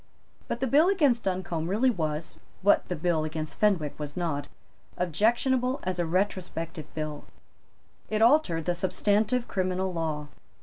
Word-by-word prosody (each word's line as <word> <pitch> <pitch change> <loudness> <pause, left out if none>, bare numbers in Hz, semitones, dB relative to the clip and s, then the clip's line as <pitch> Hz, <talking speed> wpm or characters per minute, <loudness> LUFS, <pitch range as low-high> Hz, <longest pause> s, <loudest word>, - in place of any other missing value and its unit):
But 240 - -3
the - - +2
bill 295 +7 +5
against 285 -12 +2
Duncombe 180 -4 -2
really 225 +8 +3
was, 155 -5 -3 0.2
what 205 - +4
the 180 - -2
bill 160 0 0
against 155 0 -4
Fenwick 180 -10 +1
was 145 +1 -6
not, 145 -5 -2 0.5
objectionable 240 - +1
as 185 -1 -2
a 170 - 0
retrospective 175 -3 -2
bill. 155 -1 -4 0.8
It 215 - 0
altered 225 - +4
the 175 - +1
substantive 205 +6 +1
criminal 185 0 -1
law. 155 -3 -3
180 Hz, 140 wpm, -28 LUFS, 160-220 Hz, 0.8 s, bill